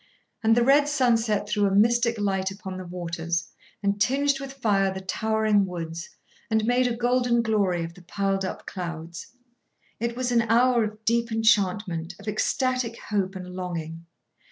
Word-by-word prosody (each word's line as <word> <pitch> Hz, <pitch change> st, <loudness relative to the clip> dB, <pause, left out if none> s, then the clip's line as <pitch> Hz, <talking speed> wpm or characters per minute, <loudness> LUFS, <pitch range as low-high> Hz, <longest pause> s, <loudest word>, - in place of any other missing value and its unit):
And 225 Hz, 0 st, +4 dB
the 240 Hz, -, +4 dB
red 285 Hz, +2 st, +5 dB
sunset 230 Hz, -7 st, +1 dB
threw 205 Hz, -1 st, +2 dB
a 195 Hz, -, 0 dB
mystic 235 Hz, +2 st, +3 dB
light 190 Hz, -2 st, 0 dB
upon 195 Hz, -1 st, -7 dB
the 185 Hz, -, -7 dB
waters, 170 Hz, -1 st, -3 dB, 0.3 s
and 200 Hz, 0 st, 0 dB
tinged 275 Hz, +5 st, +2 dB
with 275 Hz, -1 st, -7 dB
fire 205 Hz, -7 st, +1 dB
the 190 Hz, -, -5 dB
towering 215 Hz, +1 st, +1 dB
woods, 170 Hz, -1 st, -6 dB, 0.4 s
and 220 Hz, -1 st, +1 dB
made 245 Hz, +2 st, +3 dB
a 240 Hz, -, -1 dB
golden 245 Hz, -1 st, +2 dB
glory 200 Hz, -6 st, +1 dB
of 165 Hz, 0 st, -6 dB
the 180 Hz, -, -15 dB
piled 195 Hz, +2 st, -1 dB
up 185 Hz, -, -5 dB
clouds. 170 Hz, -2 st, -6 dB, 0.7 s
It 235 Hz, +1 st, -2 dB
was 250 Hz, 0 st, -1 dB
an 235 Hz, -1 st, +4 dB
hour 235 Hz, +1 st, +3 dB
of 215 Hz, 0 st, -6 dB
deep 235 Hz, 0 st, +1 dB
enchantment, 195 Hz, -5 st, +1 dB
of 205 Hz, -, -13 dB
ecstatic 240 Hz, +2 st, 0 dB
hope 195 Hz, -2 st, 0 dB
and 180 Hz, -1 st, -7 dB
longing. 165 Hz, -2 st, -5 dB
210 Hz, 165 wpm, -25 LUFS, 185-235 Hz, 0.7 s, red